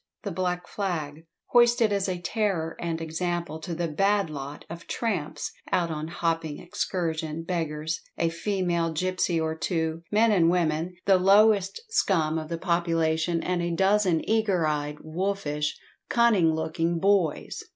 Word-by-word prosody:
The - - -3
black 180 -1 -2
flag, 165 -5 -4 0.2
hoisted 240 -3 +5
as 200 -1 0
a 180 - -1
terror 175 -3 -1
and 165 -1 -2
example 165 0 -3
to 170 +1 -5
the 170 +1 -1
"bad 195 +2 +1
lot" 145 0 -7
of 170 0 -9
"tramps 160 -10 -2 0.2
out 170 -2 +1
on 155 0 -4
hopping 165 -2 -2
excursion, 165 -4 -3
beggars, 160 -2 -2 0.2
a 170 - +1
female 170 -2 -1
gipsy 180 0 0
or 160 0 -1
two, 160 -1 -2
men 220 +2 +4
and 170 -5 +4
women, 170 0 0
the 190 -2 +5
lowest 200 - +4
scum 160 - +1
of 155 -1 -7
the 170 - -2
population, 165 -1 0
and 180 -1 0
a 170 - -1
dozen 190 -3 +2
eager 210 -6 +2
eyed, 150 -1 -1
wolfish, 155 -3 -2 0.3
cunning 220 -9 +4
looking 165 +1 -1
boys!" 190 -3 +1
170 Hz, 145 wpm, -26 LUFS, 160-190 Hz, 0.3 s, hoisted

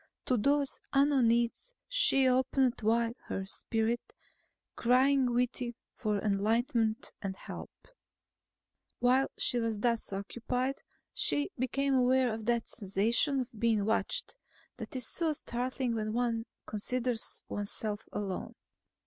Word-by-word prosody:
To 255 - +2
those 280 +4 +1
unknown 275 -3 +4
needs 235 - +1 0.2
she 385 - +4
opened 255 0 +2
wide 230 +2 +2
her 195 - -3
spirit, 225 +4 -2 0.6
crying 255 +1 +3
within 245 0 0 0.2
for 210 -3 0
enlightenment 220 +3 +1
and 195 -2 -3
help. - - -8 1.3
While 255 +2 +3
she 245 - +2
was 225 -2 -1
thus 230 0 0
occupied, 245 +6 -2 0.3
she 290 - +1
became 275 +2 0
aware 255 -1 +3
of 220 0 -6
that 235 0 +1
sensation 230 +7 +1
of 245 0 -6
being 220 -3 +2
watched 220 - 0 0.4
that - - -8
is 255 -2 0
so 320 +4 +2
startling 250 -2 -2
when 215 -1 -2
one 230 -1 0 0.2
considers 235 +2 -2
oneself 205 +1 -3
alone. 195 -3 -4
240 Hz, 120 wpm, -31 LUFS, 220-260 Hz, 1.3 s, unknown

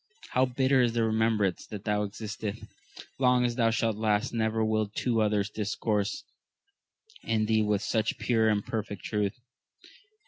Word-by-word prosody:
How 130 +1 +3
bitter 130 +1 +2
is 120 -2 +2
the 115 -1 +1
remembrance 110 -4 +1
that 105 -2 -7
thou 105 -1 0
excitest! 110 0 -6 0.6
long 125 -1 +4
as 120 - 0
thou 115 -2 +3
shalt 115 -1 0
last, 110 +2 0
never 110 -1 +1
will 110 -1 +1
two 115 +2 0
others 105 -1 +1
discourse 105 -1 -1 1.0
in 110 -1 0
thee 110 0 +2
with 105 -1 0
such 110 -1 0
pure 110 -2 +2
and 105 -1 0
perfect 105 -3 -4
truth 105 -2 -1
110 Hz, 150 wpm, -28 LUFS, 105-115 Hz, 1.0 s, long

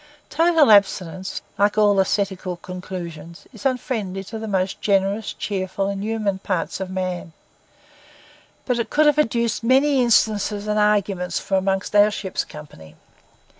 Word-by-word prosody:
Total 325 -5 +4
abstinence, 190 -2 +2 0.2
like 205 +1 +2
all 205 -2 +4
ascetical 190 -2 -1
conclusions, 170 -3 -8
is 275 - -1
unfriendly 215 -7 -3
to 220 +3 -7
the 220 - -5
most 190 -2 -1
generous, 200 +1 +1
cheerful, 195 -1 -3
and 200 0 -4
human 215 -3 -1
parts 185 -3 -3
of 190 -1 -4
man; 185 -3 -4 1.3
but 250 -2 0
it 235 - -2
could 305 +1 +3
have 295 0 +4
adduced 235 -5 0
many 265 +3 +3
instances 215 -3 +2
and 210 0 0
arguments 200 -3 +1
from 195 - -1
among 190 +1 0
our 205 0 +6
ship's 195 -3 -3
company. 80 - -13
200 Hz, 140 wpm, -22 LUFS, 185-220 Hz, 1.3 s, our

